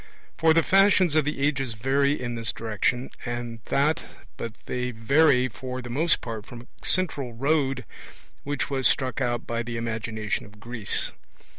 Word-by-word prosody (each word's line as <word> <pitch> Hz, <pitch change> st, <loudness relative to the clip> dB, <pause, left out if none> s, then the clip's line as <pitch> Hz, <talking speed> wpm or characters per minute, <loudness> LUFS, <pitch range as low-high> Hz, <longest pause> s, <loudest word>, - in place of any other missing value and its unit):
For 160 Hz, 0 st, +4 dB
the 165 Hz, -, +5 dB
fashions 190 Hz, -3 st, +5 dB
of 155 Hz, -2 st, +3 dB
the 150 Hz, -1 st, -2 dB
ages 135 Hz, -4 st, 0 dB
vary 140 Hz, +5 st, +2 dB
in 120 Hz, -1 st, -3 dB
this 115 Hz, -1 st, -2 dB
direction 115 Hz, +3 st, -1 dB
and 120 Hz, -1 st, -4 dB
that, 150 Hz, +3 st, +2 dB, 0.3 s
but 115 Hz, -, -5 dB
they 125 Hz, 0 st, -2 dB
vary 130 Hz, +3 st, +4 dB
for 130 Hz, +2 st, -6 dB
the 120 Hz, -1 st, -7 dB
most 155 Hz, +6 st, +2 dB
part 110 Hz, -3 st, -5 dB
from 120 Hz, -1 st, -9 dB
a -, -, -22 dB, 0.2 s
central 145 Hz, -9 st, 0 dB
road 135 Hz, 0 st, +1 dB, 0.6 s
which 145 Hz, 0 st, -1 dB
was 135 Hz, -2 st, +2 dB
struck 130 Hz, -1 st, 0 dB
out 120 Hz, -2 st, 0 dB
by 115 Hz, 0 st, -2 dB
the 115 Hz, 0 st, -4 dB
imagination 110 Hz, -2 st, -2 dB
of 105 Hz, 0 st, -17 dB
Greece. 115 Hz, -1 st, -1 dB
125 Hz, 165 wpm, -26 LUFS, 115-140 Hz, 0.6 s, the